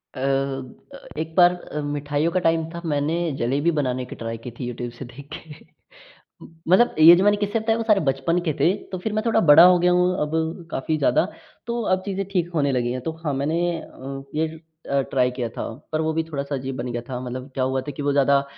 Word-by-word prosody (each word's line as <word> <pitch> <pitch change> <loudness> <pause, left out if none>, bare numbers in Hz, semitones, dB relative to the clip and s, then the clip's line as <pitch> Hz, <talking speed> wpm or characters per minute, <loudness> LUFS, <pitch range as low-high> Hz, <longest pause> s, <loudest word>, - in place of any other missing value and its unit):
अ - - -7
अ, 135 - -3 0.2
एक 160 0 -4
बार 175 0 +6
अ, 165 -4 -6
मिठाइयों 145 +2 -1
का 185 - +1
टाइम 165 -2 +1
था 170 - -6
मैंने 150 0 0 0.2
जलेबी 140 +8 +1
बनाने 130 -1 -2
की - - -9
ट्राई 115 0 -5
की 125 - -6
थी 125 - -3
यूट्यूब 120 0 -5
से - - -7
देख 130 +4 -12
के 155 -4 -13 1.1
मतलब 190 +7 +4
ये 160 +2 +10
जो 185 - +2
मैंने 205 0 +4
किस्से 205 +2 -1
बताए 225 0 +1
वो 230 - -2
सारे 210 -3 +4
बचपन 135 +6 +1
के - - +2
थे। 175 - +4 0.2
तो 185 - -3
फिर 210 +4 -4
मैं 215 0 0
थोड़ा 225 -1 +3
बड़ा 160 -3 +8
हो 180 0 +7
गया 180 +1 +3
हूँ, 180 0 +3
अब 160 +3 -2
काफ़ी 155 +4 -1
ज़्यादा, 150 - +3 0.4
तो 235 0 -2
अब 185 -3 +1
चीज़ें 195 -1 -2
ठीक 175 -3 0
होने 140 -3 +1
लगी 120 -1 0
हैं। 130 - -4
तो 160 - -3
हाँ 150 - 0
मैंने 145 +5 -1 0.2
अ, 135 -1 -9
ये 160 +1 0 0.4
अ, 140 0 +2
ट्राई 125 -1 +2
किया 125 -1 -3
था। - - -6 0.3
पर 155 - 0
वो 160 0 0
भी 160 +1 0
थोड़ा-सा 140 -3 -4
अजीब 135 0 -4
बन 125 -1 -4
गया 120 - -2
था। 125 -2 -4
मतलब 130 +1 -6
क्या 130 - 0
हुआ 130 0 0
था 130 - -7
कि - - -4
वो 145 0 +1
ज़्यादा 140 0 +4
अ 140 - -2
150 Hz, 240 wpm, -23 LUFS, 135-175 Hz, 1.1 s, ये